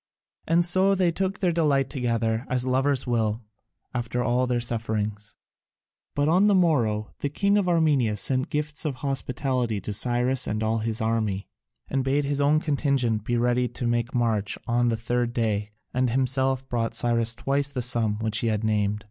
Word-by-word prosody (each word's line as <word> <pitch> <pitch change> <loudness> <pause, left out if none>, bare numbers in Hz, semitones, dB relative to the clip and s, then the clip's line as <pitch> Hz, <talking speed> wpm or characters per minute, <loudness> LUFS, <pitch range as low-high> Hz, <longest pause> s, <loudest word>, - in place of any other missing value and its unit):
And 170 +1 +3
so 190 +3 +4
they 180 -2 +2
took 190 +3 -2
their 185 -4 +1
delight 145 -5 +2
together, 115 -2 -1
as 125 0 0
lovers 130 +1 +1
will, 115 -2 -1 0.5
after 120 0 -2
all 125 +1 +1
their 125 -1 0
sufferings. 110 -3 -3 0.8
But 145 0 +1
on 185 +6 +4
the 205 - +4
morrow 120 - +1
the 145 - -2
king 200 +7 +1
of 200 -3 +2
Armenia 145 -10 +2
sent 130 +4 0
gifts 150 +2 -2
of 150 -4 -2
hospitality 130 -4 -1
to 105 - -5
Cyrus 125 +4 +1
and 110 +1 -2
all 110 +1 0
his 110 +1 -1
army, 110 -3 -1 0.4
and 135 -1 -1
bade 140 +2 +1
his 140 0 0
own 145 +2 +4
contingent 135 -8 0
make 120 -1 +2
ready 125 +1 +1
to 120 -1 -1
march 110 -4 0
on 120 0 +2
the 115 -1 +1
third 120 +1 -1
day, 105 -3 -1 0.2
and 125 0 +1
himself 130 +1 0
brought 115 -2 -2
Cyrus 115 -1 +1
twice 140 +3 -1
the 130 -3 -3
sum 115 -3 +1
which 110 -1 0
he 115 - -1
had 110 -1 -1
named. 105 -1 0
125 Hz, 175 wpm, -25 LUFS, 115-140 Hz, 0.8 s, so